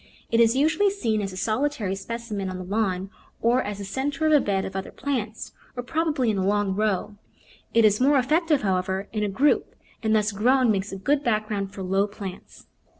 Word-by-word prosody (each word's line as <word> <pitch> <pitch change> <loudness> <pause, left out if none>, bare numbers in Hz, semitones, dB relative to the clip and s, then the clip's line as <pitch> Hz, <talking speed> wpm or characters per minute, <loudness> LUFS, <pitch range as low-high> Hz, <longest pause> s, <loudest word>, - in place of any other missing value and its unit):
It 230 - +3
is 230 +1 +5
usually 315 +8 +3
seen 230 - -1
as 195 -1 -3
a 185 - -9
solitary 220 -2 -1
specimen 210 -1 -4
on 185 - -5
the 185 - -6
lawn, 195 -1 -1 0.3
or 240 +3 +3
as 205 -3 -4
the 200 - -6
centre 275 +9 -2
of 310 - +4
a 295 - +7
bed 195 -1 0
of 190 - -7
other 190 0 -4
plants, 235 -6 -4 0.3
or 245 - -3
probably 300 -4 0
in 200 - -1
a - - 0
long 205 0 +1
row; 210 0 -1 0.6
it 230 -1 +6
is 210 +2 +3
more 280 +2 +5
effective, 300 +2 +2
however, 190 0 -1
in 215 - -1
a 205 - 0
group, 280 +9 +1 0.3
and 220 -2 +2
thus 210 0 +2
grown 245 +4 +3
makes 195 0 -1
a 195 - -5
good 280 +9 +1
background 215 -4 -1
for 195 - -7
low 195 +2 +1
plants. 200 -2 -9
215 Hz, 210 wpm, -25 LUFS, 195-260 Hz, 0.6 s, a